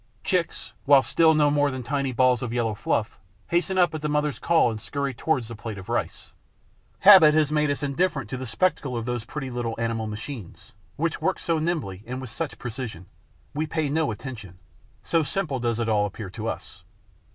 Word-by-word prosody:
Chicks, 180 -3 -1
while 140 -2 +7
still 160 +6 +4
no 150 -1 +4
more 145 0 +3
than 130 -2 -5
tiny 140 +1 -1
balls 125 -1 +3
of 120 - -3
yellow 115 -2 0
fluff, 105 0 -2 0.3
hasten 175 +2 +1
up 175 -3 +4
at 155 - -4
the 150 - -1
mother's 150 -3 0
call 165 -8 +3
and 110 -1 -6
scurry 140 -1 -3
towards 125 -2 0
the 115 - -7
plate 110 -1 -6
of 95 - -10
rice. - - -3 0.7
Habit 180 -6 +9
has 155 -2 +3
made 150 -1 +2
us 145 0 -2
indifferent 145 - 0
to 130 - -2
the 130 0 -5
spectacle 135 0 0
of 115 - -3
those 120 -2 -3
pretty 135 0 -5
little 120 -2 -3
animal 115 -1 -1
machines, 110 -2 -8 0.2
which 165 +1 -2
work 190 - +1
so 165 -2 0
nimbly 155 - -2
and 125 +1 -4
with 130 -4 -7
such 135 -6 -4
precision; 115 -7 -6 0.5
we 155 +2 -1
pay 155 -2 -1
no 155 0 +1
attention, 110 -5 -7 0.5
so 165 - +2
simple 150 -2 -1
does 120 -1 -1
it 115 - -1
all 105 -2 +2
appear 100 -1 -8
to 110 +2 -5
us. - - -6
130 Hz, 200 wpm, -25 LUFS, 115-155 Hz, 0.7 s, Habit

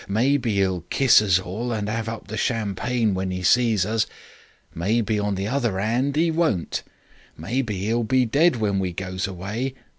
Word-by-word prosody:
Maybe 120 +2 +1
'e'll 95 -3 +1
kiss 135 -5 +5
us 95 -4 +3
all 100 +7 -4
and 105 -3 -2
'ave 110 +1 -2
up 115 - -8
the 110 - -5
champagne 115 +1 0
when 95 0 -2
'e 90 0 -4
sees 110 -1 +3
us. 110 +1 0 0.7
Maybe 105 +4 0
on 105 -1 -1
the 95 +1 -3
other 120 -6 -1
'and 125 +7 0
'e 165 +1 +3
won't. 160 - 0 0.6
Maybe 110 -6 -2
'e'll 115 +2 +1
be 130 +2 +2
dead 145 +6 +3
when 105 -4 0
we 90 -2 -2
goes 95 +1 -3
away. 100 +8 -4
110 Hz, 175 wpm, -23 LUFS, 95-120 Hz, 0.7 s, kiss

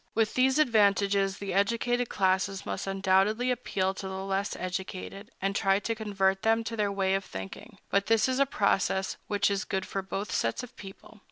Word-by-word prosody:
With 220 -1 +2
these 260 +2 +3
advantages, 200 -6 +3
the 200 -2 -4
educated 235 +4 +1
classes 190 0 0
must - - -4
undoubtedly 195 +5 +2
appeal 195 -6 -1
to 195 0 -6
the 190 0 -5
less 195 +1 -1
educated, 190 +3 -5
and 195 +1 -1
try 195 -1 +3
to 230 +3 -2
convert 195 -3 0
them 225 +1 +2
to 230 0 -4
their 210 -2 0
way 195 -1 +1
of 195 0 0
thinking; 95 - -9
but 200 0 +2
this 225 0 +3
is 260 0 0
a 275 - +4
process 195 -4 +1
which 205 0 +1
is 200 0 0
good 190 -1 -2
for 195 - -3
both 195 +2 -4
sets 115 - -1
of 250 - -11
people. 195 +2 -12
200 Hz, 190 wpm, -28 LUFS, 190-220 Hz, -, a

